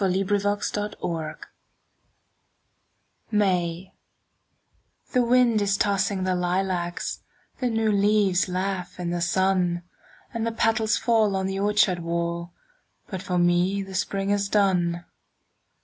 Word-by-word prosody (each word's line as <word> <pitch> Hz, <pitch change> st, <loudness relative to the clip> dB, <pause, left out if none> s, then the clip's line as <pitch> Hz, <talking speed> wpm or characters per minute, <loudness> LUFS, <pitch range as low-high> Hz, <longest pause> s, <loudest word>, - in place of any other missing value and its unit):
Sara 190 Hz, -2 st, +2 dB
Teasdale 205 Hz, -4 st, -1 dB, 1.9 s
May 185 Hz, -4 st, 0 dB, 1.2 s
THE 250 Hz, -, +3 dB
wind 240 Hz, -2 st, +3 dB
is 200 Hz, -1 st, +1 dB
tossing 200 Hz, -1 st, +1 dB
the 185 Hz, 0 st, +1 dB
lilacs, 180 Hz, -1 st, -1 dB, 0.4 s
The 250 Hz, -2 st, 0 dB
new 225 Hz, -1 st, +1 dB
leaves 200 Hz, -2 st, +2 dB
laugh 185 Hz, 0 st, -3 dB
in 175 Hz, -1 st, -2 dB
the 175 Hz, 0 st, -2 dB
sun, 180 Hz, -1 st, +1 dB, 0.5 s
And 230 Hz, -1 st, -2 dB
the -, -, 0 dB
petals 225 Hz, -1 st, +1 dB
fall 225 Hz, -3 st, +2 dB
on 190 Hz, 0 st, -1 dB
the 195 Hz, 0 st, -2 dB
orchard 205 Hz, -3 st, +2 dB
wall, 170 Hz, 0 st, -3 dB, 0.6 s
But 190 Hz, -3 st, -4 dB
for 180 Hz, -1 st, -2 dB
me 175 Hz, +3 st, +2 dB
the 195 Hz, 0 st, -10 dB
spring 195 Hz, +1 st, -1 dB
is 200 Hz, -1 st, 0 dB
done. 175 Hz, -4 st, +1 dB
195 Hz, 115 wpm, -25 LUFS, 180-205 Hz, 1.9 s, THE